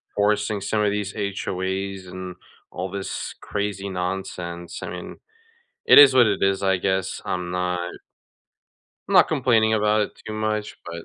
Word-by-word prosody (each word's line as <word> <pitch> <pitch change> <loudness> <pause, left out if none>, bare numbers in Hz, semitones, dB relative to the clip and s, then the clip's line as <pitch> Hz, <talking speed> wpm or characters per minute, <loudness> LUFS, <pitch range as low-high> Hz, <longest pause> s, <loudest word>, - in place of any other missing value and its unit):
forcing 105 0 +1
some 105 +2 0
of 105 - +2
these 100 -1 -3
HOAs 95 -1 -3
and 90 0 -7 0.4
all 90 +1 -4
this 100 -1 -5
crazy 100 -1 -3
nonsense, 90 -2 -5
I - - -5
mean, - - -8 0.7
it - - +8
is 140 -2 +9
what 125 -3 +6
it 100 - 0
is, 95 0 +2
I 95 -1 +3
guess, 95 0 -1
I'm 90 -1 -3
not 90 -1 -1 1.2
I'm - - -3
not - - +7
complaining 115 -4 +3
about 105 0 +2
it 105 - -4
too 110 - -5
much, 110 0 -2
but, 85 -1 -7
100 Hz, 160 wpm, -23 LUFS, 90-105 Hz, 1.2 s, is